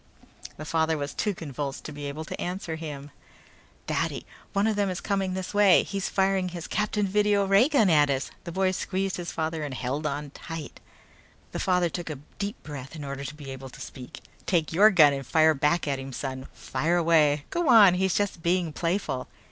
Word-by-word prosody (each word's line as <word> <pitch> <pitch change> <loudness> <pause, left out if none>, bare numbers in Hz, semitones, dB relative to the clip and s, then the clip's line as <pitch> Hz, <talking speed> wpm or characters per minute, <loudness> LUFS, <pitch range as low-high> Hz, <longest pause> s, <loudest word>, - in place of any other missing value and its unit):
The 155 - -7
father 160 0 +1
was 145 -1 -4
too 210 -3 -1
convulsed 145 -4 -5
to - - -7
be 145 -1 -6
able 150 +3 -5
to - - -6
answer 175 -2 -3
him. 145 -3 -7 0.7
"Daddy, - - -2 0.3
one 200 +1 +1
of 220 -1 +1
them 205 -1 +1
is 180 - -3
coming 195 -2 -1
this 190 +1 -5
way! 205 -3 +6
He's 195 -1 -3
firing 190 -1 +1
his 175 -2 -7
Captain 210 0 0
Video 205 0 +2
ray 195 +8 +5
gun 270 -9 +4
at 150 -4 +4
us!" 135 0 -1
They 170 - -6
boy 190 +1 +1
squeezed 190 0 -2
his 175 -1 -5
father 160 0 -2
and 140 -3 -4
held 135 +5 -2
on 145 0 -4
tight. 160 -2 -8 0.7
The - - -4
father 180 -2 +2
took 170 +1 -5
a 155 - -3 0.2
deep 205 +3 -4
breath 140 0 -8
in 155 - -7
order 140 0 -5
to 145 +2 -6
be 145 -3 -8
able 135 0 -8
to - - -13
speak. 125 -2 -9 0.3
"Take 165 -3 +1
your 205 +6 +7
gun 155 -8 +6
and 135 0 -4
fire 160 +4 +4
back 150 +3 +1
at 140 -2 -1
him, 135 0 -7
son. 130 0 -5
Fire 160 +7 -1
away! 155 -4 +3
Go 340 -4 0
on, 210 -6 +8
he's 190 0 +1
just 205 -4 -1
being 170 -1 +1
playful!" 165 -7 -2
165 Hz, 205 wpm, -27 LUFS, 145-190 Hz, 0.7 s, on